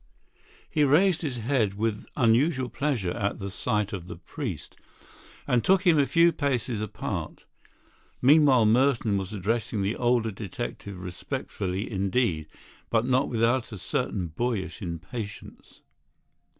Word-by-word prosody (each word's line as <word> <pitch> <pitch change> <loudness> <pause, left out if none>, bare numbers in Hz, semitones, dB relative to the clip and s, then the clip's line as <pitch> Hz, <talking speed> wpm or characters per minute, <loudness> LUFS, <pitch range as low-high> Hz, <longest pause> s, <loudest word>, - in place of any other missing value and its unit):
He 150 - +1
raised 160 +6 +4
his 140 -7 -3
head 115 -4 0
with 105 0 -2
unusual 130 +2 +3
pleasure 130 -12 -1
at 100 +3 -2
the 100 -2 -5
sight 105 +1 -1
of 90 -3 -5
the - - -7
priest, 90 - -6 0.7
and 120 -2 +2
took 190 0 +3
him 165 -4 +5
a 140 - +3
few 165 +5 +5
paces 130 -7 -1
apart. 110 - -5 0.7
Meanwhile 135 -3 +6
Merton 115 -2 +3
was 95 +1 -5
addressing 110 +1 -1
the 100 +3 0
older 120 -2 +1
detective 100 -1 -6
respectfully 90 +2 -4
indeed, 95 -5 0 0.4
but 115 0 +2
not 130 +1 +2
without 115 +2 +1
a 105 - -6
certain 90 0 -2
boyish 100 +1 -3
impatience. 100 +5 -7
115 Hz, 130 wpm, -27 LUFS, 100-130 Hz, 0.7 s, Meanwhile